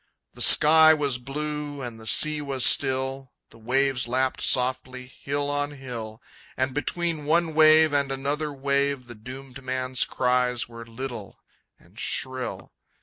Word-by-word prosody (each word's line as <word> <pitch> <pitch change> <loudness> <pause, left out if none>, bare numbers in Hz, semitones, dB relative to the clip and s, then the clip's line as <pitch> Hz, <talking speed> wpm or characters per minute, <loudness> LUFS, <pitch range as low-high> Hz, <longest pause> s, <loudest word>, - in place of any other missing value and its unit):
The - - -6
sky 160 +1 +7
was 140 -4 -1
blue, 145 +1 -5
and 120 -2 -7
the 110 - -11
sea 155 +5 +3
was 135 -3 +1
still, 135 -1 +1 0.2
The 115 - -17
waves 130 +2 0
lapped 130 +2 -1
softly, 130 0 0
hill 140 +2 -4
on 145 0 -2
hill, 120 -5 -8 0.3
And 130 0 -1
between 160 +1 -2
one 165 +1 +1
wave 155 0 +5
and 140 -1 0
another 145 +3 -3
wave 140 -1 -1
The 120 - -11
doomed 130 +4 -11
man's 130 -1 -1
cries 125 -1 0
were 115 -1 -11
little 115 -5 -8 0.4
and - - -17
shrill. 130 -1 -3
135 Hz, 145 wpm, -24 LUFS, 125-145 Hz, 0.4 s, sky